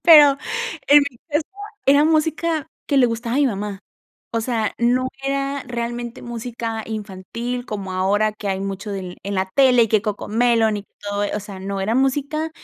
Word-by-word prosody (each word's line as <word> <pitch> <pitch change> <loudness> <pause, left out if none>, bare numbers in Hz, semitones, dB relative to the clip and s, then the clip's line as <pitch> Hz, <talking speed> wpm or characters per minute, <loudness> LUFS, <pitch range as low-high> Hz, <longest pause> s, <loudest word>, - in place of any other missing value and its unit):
pero 295 -4 +8 0.5
en 290 - +8
mi 245 - -20
casa 295 +1 +2 0.5
era 285 +2 +6
música 315 0 +1 0.2
que 285 - +1
le 255 - +6
gustaba 230 +1 -2
a - - +3
mi 290 - +4
mamá, 205 -3 -3 0.5
o 230 - +1
sea 225 -3 -1
no 250 +2 +2 0.2
era 275 0 -1
realmente 240 0 -4
música 230 -1 -4
infantil 220 +4 -5
como 200 -5 -5
ahora 205 +3 +2
que 210 -1 -6
hay 190 0 -1
mucho 195 +1 -4
del 185 -3 -5
en 200 +1 -3
la 190 0 0
tele 255 -3 +6
y - - -4
que 215 -1 +3
Coco 210 -2 -3
Melon 225 -1 +3
y 200 - -6 0.2
todo 205 0 -2
e - - -2
o 210 - -2
sea, 195 -1 -9
no, 195 0 -3
era 210 +4 0
música 285 +4 0
230 Hz, 190 wpm, -21 LUFS, 205-270 Hz, 0.5 s, pero